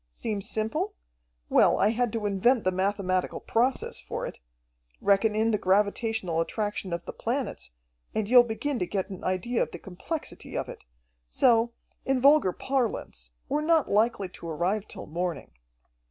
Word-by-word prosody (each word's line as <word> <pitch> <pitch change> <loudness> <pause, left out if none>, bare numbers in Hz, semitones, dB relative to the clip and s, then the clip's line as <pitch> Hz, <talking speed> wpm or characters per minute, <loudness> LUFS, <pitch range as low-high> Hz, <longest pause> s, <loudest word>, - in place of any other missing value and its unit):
Seems 200 - -4
simple? 220 0 -1 0.5
Well, - - +4
I 205 - +4
had 235 +1 0
to 225 -2 -2
invent 205 +5 +3
the 185 - +2
mathematical 185 -1 0
process 250 +3 0
for - - -5
it. - - -7 0.6
Reckon 205 +2 +3
in 220 +1 +2
the 210 - +1
gravitational 200 -2 +1
attraction 205 +1 -3
of 170 0 -3
the - - -6
planets, - - -3 0.5
and 215 -2 0
you'll 245 +2 +8
begin 240 +4 -2
to 180 - -1
get 195 0 -2
an 190 - -8
idea 185 +6 0
of - - 0
the - - -8
complexity 200 - -6
of - - -2
it. - - -10 0.4
So, 235 - +3 0.3
in 265 -1 +1
vulgar 280 -6 +5
parlance, 225 - -2 0.2
we're 295 +2 0
not 320 -1 +2
likely 210 -1 +2
to 170 -2 -9
arrive 185 +6 -1
till - - -8
morning." 170 0 -4
210 Hz, 160 wpm, -27 LUFS, 185-235 Hz, 0.6 s, you'll